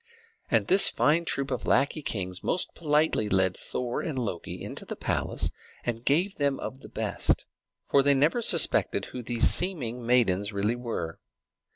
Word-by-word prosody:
And - - +2
this 190 +2 +6
fine 165 +3 +2
troop 140 -3 0
of 125 - -3
lackey 145 +3 +2
kings 95 -8 -4
most 180 - -1
politely 150 -8 +1
led 95 -1 +2
Thor 125 -1 -3
and 155 -5 -4
Loki 105 -9 -4
into - - -5
the - - -6
palace, - - -2 0.3
and 115 -1 -3
gave 175 +10 +1
them 140 -2 0
of 130 - -6
the - - -12
best, - - -1 0.4
for 140 - +4
they 140 0 +4
never 150 - +2
suspected 165 - +3
who 125 - -7
these 120 0 +1
seeming 125 -10 +1
maidens 110 -5 +2
really 105 +3 0
were. 115 -10 -5
125 Hz, 165 wpm, -27 LUFS, 110-150 Hz, 0.4 s, this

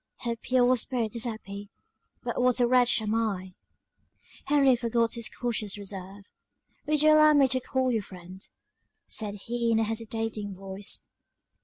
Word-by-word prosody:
Her 235 -1 -2
pure 250 +2 +2
spirit 235 -2 -1
is 235 - +1
happy; 205 -3 -7 0.5
but - - -2
what 250 0 +3
a 245 - +4
wretch 245 -2 +3
am 215 0 -1
I!" 200 -5 -2 0.9
Henry 275 -3 +4
forgot 235 -1 0
his 230 -2 -1
cautious 215 -4 -3
reserve. 195 0 -6 0.6
"Would 300 0 +2
you 310 - +6
allow 305 0 +6
me 280 -2 +5
to 260 0 +2
call 260 0 -1
you 225 -3 0
friend?" 185 -1 -12 0.7
said 210 -2 -2
he 235 0 -1
in 225 - +3
a 225 - +2
hesitating 225 -2 -3
voice. 195 +1 -4
230 Hz, 155 wpm, -27 LUFS, 205-250 Hz, 0.9 s, you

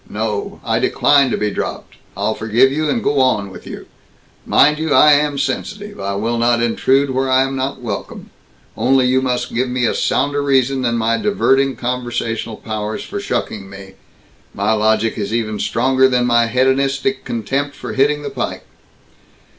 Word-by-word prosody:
No! 105 -1 -3
I - - +1
decline 140 -2 +3
to - - -1
be 105 -1 -1
dropped. - - -5 0.2
I'll 110 - 0
forgive 115 +6 +2
you 155 +2 -1
and 235 - -1
go 145 -5 +1
on 110 -7 +1
with - - -12
you. - - -8 0.6
Mind 150 +2 +4
you, 160 -2 0
I 150 - +7
am 145 0 +2
sensitive. 205 +10 -4
I 100 0 -3
will 115 +4 -1
not 120 0 +2
intrude 130 +4 +1
where 130 0 -1
I 130 0 +4
am 135 0 -3
not 130 -1 -3
welcome. 105 -4 -6 0.4
Only 130 0 +2
you 130 +1 +2
must 125 -1 -2
give 125 +2 0
me 125 0 0
a - - +1
sounder 145 0 0
reason 135 -1 +1
than 120 -2 0
my 115 0 +1
diverting 135 -10 +1
conversational 120 -2 -3
powers 110 -1 -4
for 205 - -6
shucking 105 - -4
me. 100 -1 -11 0.6
My 100 +2 0
logic 110 +1 +1
is 100 0 -3
even 110 -2 -2
stronger 130 +4 +2
than 125 -1 +1
my 120 -1 +3
hedonistic 135 +2 0
contempt 135 +6 -3
for - - -7
hitting 145 +2 +1
the - - -5
pike." - - -4
125 Hz, 175 wpm, -18 LUFS, 115-135 Hz, 0.6 s, I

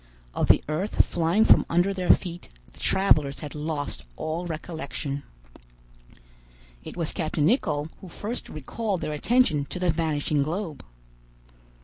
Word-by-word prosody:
Of - - 0
the - - +5
earth 165 +8 +1
flying 175 +6 +2
from - - +7
under 175 +4 +2
their 185 -2 -3
feet, 175 -1 +2 0.2
the - - -17
travelers 155 -8 +2
had 150 - -6
lost 150 - -3
all 165 - -3
recollection. 155 -3 -4 1.6
It - - -9
was 165 -3 -1
captain 155 -2 0
Nicholl 155 - +1
who 185 - -10
first 215 +8 -5
recalled 190 - -3
their 150 - -2
attention 155 - +2
to 160 - -6
the 180 -1 +2
vanishing 155 -3 0
globe. 160 +1 -3
160 Hz, 135 wpm, -26 LUFS, 150-185 Hz, 1.6 s, from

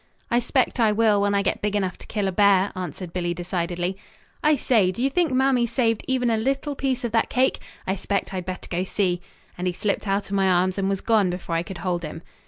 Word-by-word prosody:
"I 240 - +4
'spect 255 +1 0
I 220 -2 +4
will, 210 -1 +3
when 205 0 +2
I 200 - +2
get - - -1
big 210 0 -1
enough 190 -3 0
to - - -12
kill 205 -3 -1
a - - 0
bear," 200 0 +4
answered 180 -1 -6
Billy 175 -1 -1
decidedly. 175 +1 -2 0.4
"I 305 0 +5
say, 225 -8 +2
do 185 - -10
you 270 +3 +1
think 340 -1 +2
Mamie 255 -2 +3
saved 230 -1 0
even 250 -2 +1
a 225 - +2
little 275 +5 -1
piece 265 -2 -1
of 235 - -2
that 225 0 +2
cake? 260 +1 +2 0.3
I 190 - 0
'spect 200 0 -2
I - - -2
had 180 - -4
better 185 0 -5
go 175 +1 -1
see," 185 -2 0 0.4
and 180 - -1
he 180 - 0
slipped 200 +3 -2
out 195 0 -1
of - - 0
my 195 -1 +3
arms 185 +1 +2
and 195 0 +1
was 195 -1 -1
gone 215 -5 +3
before 175 -1 -4
I 165 - +2
could 175 +2 -7
hold 175 -1 0
him. 160 +1 -7
200 Hz, 250 wpm, -24 LUFS, 185-235 Hz, 0.4 s, I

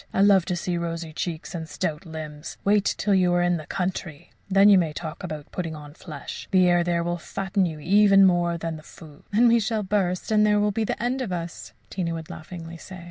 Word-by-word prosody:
I - - +3
love 195 -3 +5
to 180 - -1
see 175 0 -2
rosy 165 -1 -4
cheeks 165 +1 -4
and 160 -2 -5
stout 155 +3 -3
limbs. 155 -1 -7
Wait 205 0 +3
till 205 - +1
you're 175 -2 +3
in 175 0 +2
the 155 -2 -9
country! 180 -5 -4 0.2
Then 195 +1 +6
you 200 -2 +7
may 160 -4 -1
talk 160 +3 -7
about 155 -4 -6
putting 165 -3 -4
on 145 -1 -10
flesh. - - -8
The 185 -1 +4
air 175 -1 +4
there 170 -1 0
will 175 0 -2
fatten 190 +2 -1
you 155 -2 -6
even 195 +4 +5
more 175 -2 +2
than 165 -1 -4
the - - -11
food." 155 -2 -14
"Then 230 +4 +5
we 235 0 +5
shall 215 0 -1
burst, 190 -1 -1
and 210 -1 +4
there 210 -1 +4
will 210 0 +2
be 225 +2 -2
an - - +1
end 245 +4 -1
of 230 -7 -3
us," 170 -1 -5 0.2
Tina 170 -3 -2
would 160 -1 -7
laughingly 165 +1 -9
say. 185 +3 -10
175 Hz, 230 wpm, -25 LUFS, 165-195 Hz, 0.2 s, you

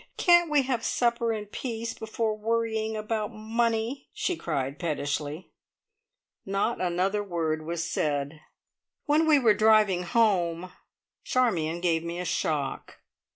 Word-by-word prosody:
Can't 345 -1 +5
we 295 -2 +3
have 250 -3 -1
supper 235 -1 +1
in 215 -2 -3
peace, 230 +1 -5
before 220 0 -2
worrying 220 0 -1
about 215 0 -2
money!" 230 +3 -1
she 360 - -1
cried 140 - -3
pettishly. 150 0 -3 0.9
Not 195 +4 -1
another 185 +3 0
word 160 -4 -2
was 170 0 -2
said. 145 -1 -2 0.6
When 310 +2 +3
we 305 -2 +6
were 235 -6 +5
driving 215 -4 +4
home, 180 -3 +1 0.5
Charmion 175 -10 0
gave 165 -2 +1
me 170 +1 -4
a 180 - -3
shock. 150 -5 -2
210 Hz, 125 wpm, -27 LUFS, 170-230 Hz, 0.9 s, we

